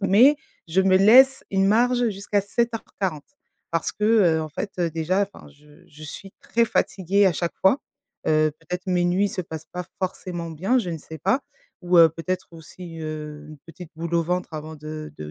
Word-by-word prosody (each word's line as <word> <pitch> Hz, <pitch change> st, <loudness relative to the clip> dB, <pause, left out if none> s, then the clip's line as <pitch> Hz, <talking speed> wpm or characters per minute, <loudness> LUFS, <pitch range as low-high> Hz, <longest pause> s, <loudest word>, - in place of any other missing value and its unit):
mais, 225 Hz, +9 st, +5 dB, 0.3 s
je 180 Hz, +4 st, +2 dB
me 190 Hz, 0 st, +4 dB
laisse 260 Hz, +7 st, +6 dB
une 195 Hz, 0 st, +2 dB
marge 240 Hz, +3 st, +3 dB
jusqu'à 200 Hz, +1 st, -1 dB
07:40. 200 Hz, -7 st, -3 dB, 0.4 s
Parce 165 Hz, 0 st, -1 dB
que, 210 Hz, -, -3 dB
heu, 190 Hz, -8 st, +4 dB
en 155 Hz, -, -5 dB
fait, 185 Hz, +4 st, -6 dB
déjà, 165 Hz, +3 st, 0 dB
enfin, -, -, -14 dB
je 150 Hz, +1 st, -20 dB
je 155 Hz, +1 st, -15 dB
suis 190 Hz, +6 st, -9 dB
très 235 Hz, 0 st, +1 dB
fatiguée 200 Hz, -2 st, +1 dB
à 185 Hz, -, +3 dB
chaque 170 Hz, +1 st, -3 dB
fois, 190 Hz, +8 st, +4 dB, 0.5 s
heu, 155 Hz, 0 st, +3 dB
peut-être 180 Hz, +3 st, -6 dB
mes 180 Hz, -1 st, +1 dB
nuits 185 Hz, +3 st, +2 dB
se 185 Hz, -, -4 dB
passent 160 Hz, -2 st, -8 dB
pas 180 Hz, 0 st, -4 dB
forcément 180 Hz, -2 st, -4 dB
bien, 190 Hz, +11 st, +1 dB
je 220 Hz, -, -2 dB
ne 165 Hz, -, -4 dB
sais 160 Hz, +1 st, -10 dB
pas, 195 Hz, -, +1 dB, 0.4 s
ou, 175 Hz, 0 st, +3 dB
heu, 165 Hz, -1 st, +9 dB
peut-être 180 Hz, +3 st, -4 dB
aussi, 165 Hz, +1 st, -11 dB
heu, 150 Hz, -1 st, -6 dB
une 155 Hz, -1 st, -11 dB
petite 170 Hz, 0 st, -11 dB
boule 170 Hz, +1 st, -4 dB
au 170 Hz, -, +3 dB
ventre 180 Hz, -1 st, -3 dB
avant 155 Hz, +1 st, -7 dB
de 155 Hz, 0 st, -8 dB
de 75 Hz, 0 st, -7 dB
180 Hz, 190 wpm, -24 LUFS, 160-195 Hz, 0.5 s, heu